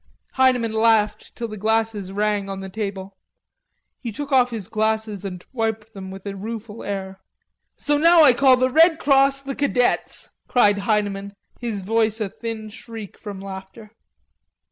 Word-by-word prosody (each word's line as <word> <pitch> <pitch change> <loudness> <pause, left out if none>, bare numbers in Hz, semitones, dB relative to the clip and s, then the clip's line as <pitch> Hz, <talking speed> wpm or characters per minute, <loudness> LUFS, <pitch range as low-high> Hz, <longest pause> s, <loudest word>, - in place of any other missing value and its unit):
Heineman 250 -4 +2
laughed 220 -1 +2
till 235 - -4
the 215 -1 -8
glasses 220 -2 0
rang 205 0 -1
on 195 0 -5
the 195 0 -7
table. 195 -1 -5 0.8
He 235 - -5
took 290 +6 -6
off 255 -2 +4
his 220 -6 -5
glasses 220 -2 -1
and 180 -3 -7
wiped 225 -2 -2
them 190 -1 -8
with 190 +1 -10
a 200 -1 -4
rueful 220 +2 -7
air. 190 -1 -5 0.5
"So 290 0 0
now 335 +1 +7
I 270 -4 +7
call 260 0 +5
the 255 +1 +1
Red 325 +3 +6
Cross 275 -2 +3
the 275 0 -4
Cadets!" 265 -4 0 0.2
cried 205 -5 +4
Heineman, 200 -1 -1 0.2
his 225 -5 -3
voice 220 +2 +1
a 210 -3 -2
thin 220 0 -6
shriek 220 -1 -9
from 205 -3 -8
laughter. 195 +2 -9
220 Hz, 160 wpm, -22 LUFS, 200-245 Hz, 0.8 s, now